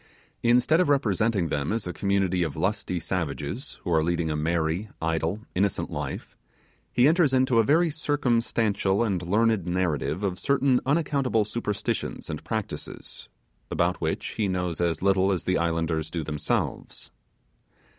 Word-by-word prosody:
Instead 125 +7 +4
of 180 - +3
representing 110 - +2
them 70 +2 -1
as 115 0 -1
a 90 - -4
community 95 -2 +1
of 80 -4 -1
lusty 90 - -1
savages, 80 - -4
who 90 - -3
are 80 -1 +3
leading 85 -1 0
a - - -1
merry, 80 +5 -1
idle, 80 +5 -1
innocent 100 +2 0
life, - - -5 0.6
he 125 +2 +4
enters 155 -4 +4
into 130 -2 +3
a - - +5
very 160 +7 +3
circumstantial 115 -8 +1
and 100 -6 0
learned 105 +1 +1
narrative 90 -1 -1
of 90 -2 -1
certain 140 -2 +2
unaccountable 140 -7 +1
superstitions 105 -6 -3
and 75 - -6
practices, 110 - -6 0.4
about - - 0
which - - -2
he 105 - -1
knows 90 -3 -2
as 85 -1 0
little 95 0 +3
as 90 - -1
the 90 - +1
islanders 80 -1 -1
themselves. 75 -3 -3
95 Hz, 145 wpm, -26 LUFS, 85-120 Hz, 0.6 s, a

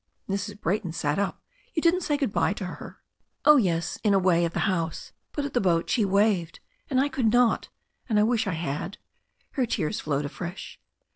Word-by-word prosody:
Mrs. 200 +1 -3
Brayton 185 -3 -1
sat 150 +1 -1
up. 200 -2 -2 0.3
"You 315 - +1
didn't 345 +2 +4
say 295 -3 0
good 275 -8 -1
bye 170 +3 +2
to 205 - -5
her 180 - -8 0.2
!" - - -49
"Oh, 300 0 +8
yes, 175 -7 0
in 205 -2 +4
a - - +6
way 180 -2 +3
— - - +3
^at - - -18
the - - -1
house; 170 -5 -1 0.2
but 290 - -2
at 285 - -5
the 245 - +2
boat 170 -3 +1
she 225 -5 +3
waved, 195 -4 +1 0.3
and 260 -3 +2
I 275 - +3
could 260 -5 +1
not. 245 -1 +3 0.4
And 215 -2 +3
I - - +5
wish 225 -1 +1
I 190 - 0
had." 165 +4 -3 0.5
Her 255 -3 0
tears 155 - -1
flowed 145 -1 -1
afresh. 175 +5 -7
200 Hz, 215 wpm, -26 LUFS, 170-240 Hz, 0.5 s, Oh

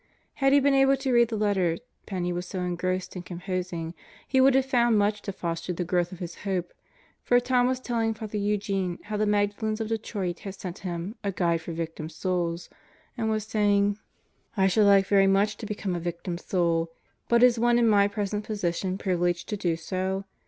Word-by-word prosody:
Had 270 -2 +2
he 285 - +6
been 280 0 +3
able 270 0 +4
to 265 -1 -1
read 235 -1 +5
the 225 -1 -3
letter 190 -5 +1 0.3
Penney 180 -3 -2
was 175 +1 -4
so 185 0 -4
engrossed 180 +1 -2
in 180 - -4
composing 175 -2 -4 0.3
he 265 0 +3
would 265 0 +5
have 265 -1 +3
found 240 -4 +3
much 205 0 +1
to 200 - -4
foster 170 -1 -3
the 180 - -2
growth 175 0 0
of 185 - -8
his 175 -1 -7
hope, 185 -3 -3 0.5
for 245 - +4
Tom 245 0 +2
was 255 0 0
telling 230 -3 -1
Father 215 -1 -5
Eugene 200 -3 -1
how 210 0 -5
the 210 0 +1
Magdalens 210 +1 0
of 220 -1 -3
Detroit 205 -5 -3
had 195 -1 -7
sent 180 -2 -7
him 180 +1 -4
A 200 - 0
Guide 170 -2 0
for 165 - -7
Victim 160 -1 -5
Souls 175 0 -2 0.5
and 225 -2 -1
was 215 -1 0
saying: 205 -1 +2 0.6
I 190 - +4
should 205 +2 +4
like 195 -1 +6
very 195 0 +4
much 200 +2 +2
to 220 - -7
become 205 -3 -3
a 175 - -2
Victim 175 +1 -4
Soul; 170 -3 0 0.4
but 235 0 +5
is 245 -2 +5
one 240 +1 +4
in 235 -1 +4
my 200 -2 +5
present 205 0 -3
position 190 -3 -2
privileged 175 -2 0
to 210 - -1
do 175 -4 0
so? 190 +3 -3
200 Hz, 200 wpm, -27 LUFS, 175-220 Hz, 0.6 s, he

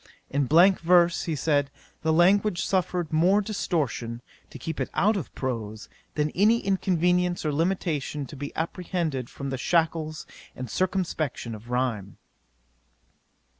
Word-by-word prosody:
In 140 -1 +1
blank 180 +6 +6
verse, 175 0 +4
he 165 - -1
said, 145 -1 +1 0.3
the 160 - +1
language 180 +2 +3
suffered 180 -3 -1
more 180 +6 +4
distortion, 145 - -2 0.3
to - - -10
keep 160 - -5
it - - -2
out 215 +3 +3
of 185 -8 -4
prose, 110 -4 -4 0.3
than 150 0 0
any 215 +5 +4
inconvenience 180 -3 +1
or 150 - 0
limitation 155 -3 -1
to 145 - -10
be 145 +1 -6
apprehended 165 -6 -2
from 140 -1 -6
the 130 - -3
shackles 160 0 0 0.3
and 125 -3 -6
circumspection 175 -10 -1
of 110 +2 -10
rhyme. 120 -6 -2
160 Hz, 135 wpm, -26 LUFS, 135-180 Hz, 0.3 s, blank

